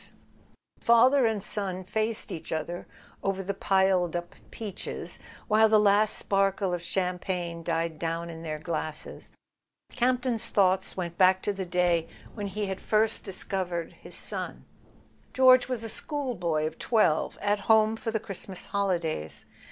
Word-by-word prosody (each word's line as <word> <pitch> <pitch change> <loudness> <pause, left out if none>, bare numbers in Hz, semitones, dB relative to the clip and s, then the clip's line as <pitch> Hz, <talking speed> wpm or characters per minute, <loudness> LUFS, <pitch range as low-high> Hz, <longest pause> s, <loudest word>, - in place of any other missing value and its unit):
As - - -9 0.7
father 245 +2 +6
and 215 -3 -1
son 190 -3 -3
faced 220 +3 -2
each 160 - -6
other 160 +2 -3 0.3
over 195 0 -1
the 200 +2 -2
piled 190 -3 +2
up 175 0 -4 0.2
peaches, 210 -4 -6 0.3
while 220 +1 +5
the 215 0 +6
last 210 +1 +4
sparkle 195 -1 +1
of 175 - -2
champagne 180 -1 -2
died 165 -1 -2
down 165 0 -2
in 165 -1 -8
their 155 -2 -4
glasses, 155 -1 -5 0.6
Campton's 250 -2 +1
thoughts 190 -1 +2
went 170 -2 -4
back 185 0 +5
to 205 - 0
the 190 -2 -5
day 175 -2 +1 0.2
when 205 -2 -4
he 205 +2 -3
had 190 -1 -4
first 215 0 +1
discovered 180 -3 -3
his - - -10
son. - - -5 0.7
George 255 -1 +6
was 245 -3 -2
a - - -3
schoolboy 220 - -1
of 155 +1 -5
twelve, 215 -10 +2
at 205 0 +1
home 220 0 +5
for 225 - -4
the 220 0 0
Christmas 195 -3 -6
holidays. 175 - -2
190 Hz, 150 wpm, -28 LUFS, 175-215 Hz, 0.7 s, father